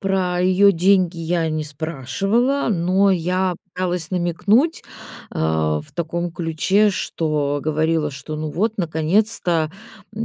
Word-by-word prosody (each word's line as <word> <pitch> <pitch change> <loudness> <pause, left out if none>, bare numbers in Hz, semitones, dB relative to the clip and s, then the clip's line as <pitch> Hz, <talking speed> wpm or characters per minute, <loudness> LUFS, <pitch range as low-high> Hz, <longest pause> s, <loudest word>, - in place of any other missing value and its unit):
про 185 -2 0
её 185 +2 +5
деньги 185 -1 +2
я 165 0 -1
не 155 0 -2
спрашивала. 170 - -1
Но 190 +1 +2
я 185 +1 0 0.2
пыталась 180 -3 -2
намекнуть, 200 - +1 0.5
э, - - -9
в 80 -1 0
таком 170 0 -3
ключе, 180 +5 +1
что 150 -6 -1
говорила, 155 0 0
что: 150 +2 -7
"Ну 155 0 -4
вот, 215 +8 0
наконец-то, 170 0 +1 0.4
м, 220 +2 -3
175 Hz, 125 wpm, -21 LUFS, 155-195 Hz, 0.5 s, её